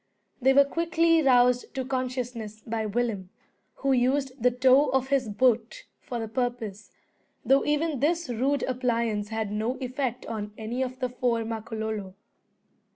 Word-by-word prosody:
They 265 Hz, +2 st, +5 dB
were 280 Hz, 0 st, +7 dB
quickly 330 Hz, +1 st, +2 dB
roused 250 Hz, -2 st, +3 dB
to 260 Hz, -1 st, -2 dB
consciousness 250 Hz, -4 st, -4 dB
by 220 Hz, -1 st, -2 dB
Willem, 210 Hz, -4 st, -2 dB, 0.5 s
who 275 Hz, -, -1 dB
used 265 Hz, +2 st, +2 dB
the 250 Hz, -, +5 dB
toe 255 Hz, +3 st, +4 dB
of 265 Hz, 0 st, 0 dB
his 270 Hz, -5 st, +1 dB
boot 225 Hz, +1 st, +1 dB
for 245 Hz, -, -6 dB
the 225 Hz, -, -3 dB
purpose; 225 Hz, -4 st, -3 dB, 0.6 s
though 270 Hz, +1 st, +4 dB
even 295 Hz, -1 st, 0 dB
this 335 Hz, +4 st, +1 dB
rude 260 Hz, +4 st, 0 dB
appliance 235 Hz, -5 st, -1 dB
had 220 Hz, -2 st, -3 dB
no 220 Hz, +5 st, -1 dB
effect 255 Hz, -1 st, -3 dB
on 210 Hz, -2 st, -5 dB
any 225 Hz, +4 st, -3 dB
of 255 Hz, -1 st, -3 dB
the 255 Hz, -, 0 dB
four 240 Hz, -2 st, 0 dB
Makololo. 220 Hz, -3 st, -4 dB
245 Hz, 150 wpm, -27 LUFS, 220-265 Hz, 0.6 s, were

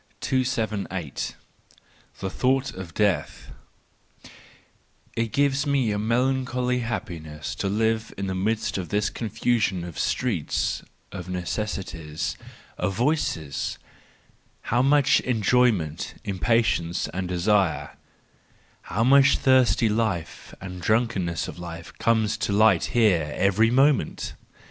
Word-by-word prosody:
278. 110 Hz, -, -2 dB, 0.9 s
The 95 Hz, -, -2 dB
Thought 135 Hz, +1 st, +1 dB
of 95 Hz, -3 st, -9 dB
Death 105 Hz, -3 st, 0 dB, 1.6 s
.—It 115 Hz, -1 st, -1 dB
gives 140 Hz, 0 st, +2 dB
me^a 125 Hz, -8 st, +1 dB
melancholy 125 Hz, +2 st, 0 dB
happiness 80 Hz, -10 st, -5 dB
to 95 Hz, -, -2 dB
live 110 Hz, +2 st, 0 dB
in 100 Hz, -, -3 dB
the 95 Hz, -, -2 dB
midst 105 Hz, +2 st, -1 dB
of 90 Hz, -, -5 dB
this 105 Hz, 0 st, 0 dB
confusion 110 Hz, -4 st, 0 dB
of 85 Hz, -2 st, -7 dB
streets, -, -, -1 dB, 0.3 s
of 90 Hz, -2 st, -7 dB
necessities, 90 Hz, -4 st, -3 dB, 0.4 s
of 95 Hz, +1 st, -1 dB
voices: 105 Hz, -, -1 dB, 1.0 s
how 120 Hz, -, +4 dB
much 140 Hz, +1 st, +4 dB
en¬ 115 Hz, -4 st, -1 dB
joyment, 100 Hz, -10 st, +2 dB
impatience 100 Hz, -4 st, +1 dB
and 90 Hz, +1 st, -3 dB
desire, 90 Hz, -5 st, +1 dB, 0.9 s
how 115 Hz, -, -1 dB
much 140 Hz, +2 st, +6 dB
thirsty 130 Hz, -3 st, +4 dB
life 105 Hz, -7 st, -2 dB
and 90 Hz, -2 st, -8 dB
drunkenness 95 Hz, -5 st, 0 dB
of -, -, -8 dB
life 85 Hz, -1 st, -8 dB
comes 110 Hz, -1 st, +2 dB
to 100 Hz, -, -2 dB
light 100 Hz, -3 st, +4 dB
here 90 Hz, -10 st, +2 dB
every 100 Hz, +3 st, +3 dB
moment! 135 Hz, -, +2 dB
105 Hz, 110 wpm, -25 LUFS, 90-120 Hz, 1.6 s, much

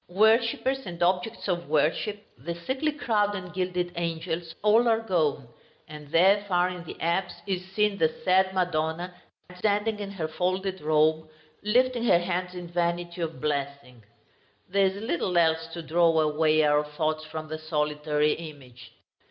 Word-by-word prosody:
Worshippers 230 Hz, +5 st, +2 dB
and 175 Hz, -1 st, -3 dB
objects 185 Hz, +6 st, 0 dB
of 175 Hz, -4 st, -2 dB
worship, 165 Hz, +8 st, 0 dB
the 170 Hz, +8 st, -6 dB
sickly 260 Hz, -, -2 dB
crowd 210 Hz, -8 st, 0 dB
and 180 Hz, -2 st, -7 dB
gilded 180 Hz, -1 st, -2 dB
angels, 165 Hz, 0 st, -3 dB
all 220 Hz, +3 st, +5 dB
are 225 Hz, -1 st, +3 dB
gone; 160 Hz, -, 0 dB, 0.4 s
and 150 Hz, -1 st, -10 dB
there, 195 Hz, +5 st, +5 dB
far 180 Hz, -1 st, +2 dB
in 180 Hz, -1 st, -7 dB
the -, -, -9 dB
apse, 175 Hz, +2 st, -1 dB
is 190 Hz, -2 st, -2 dB
seen 210 Hz, -1 st, +1 dB
the 160 Hz, -, +4 dB, 0.2 s
sad 190 Hz, +1 st, +4 dB
Madonna 175 Hz, -1 st, -1 dB, 0.4 s
standing 210 Hz, +3 st, 0 dB
in 200 Hz, -1 st, -5 dB
her 185 Hz, -6 st, -4 dB
folded 185 Hz, +3 st, -2 dB
robe, 155 Hz, +1 st, +2 dB, 0.3 s
lifting 245 Hz, +3 st, +2 dB
her 175 Hz, -, +5 dB
hands 180 Hz, +1 st, -2 dB
in 175 Hz, -1 st, -7 dB
vanity 175 Hz, 0 st, -2 dB
of 165 Hz, -1 st, -4 dB
blessing. 140 Hz, -5 st, -4 dB, 0.6 s
There 195 Hz, +1 st, +3 dB
is 190 Hz, -, -2 dB
little 180 Hz, -3 st, -1 dB
else 165 Hz, -1 st, +3 dB
to 170 Hz, -, -6 dB
draw 165 Hz, 0 st, +3 dB
away 155 Hz, 0 st, +3 dB
our 150 Hz, 0 st, +3 dB
thoughts 155 Hz, +1 st, -2 dB
from 155 Hz, 0 st, -6 dB
the 155 Hz, 0 st, -5 dB
solitary 150 Hz, -1 st, 0 dB
image. 140 Hz, -7 st, -11 dB
175 Hz, 155 wpm, -27 LUFS, 155-195 Hz, 0.6 s, all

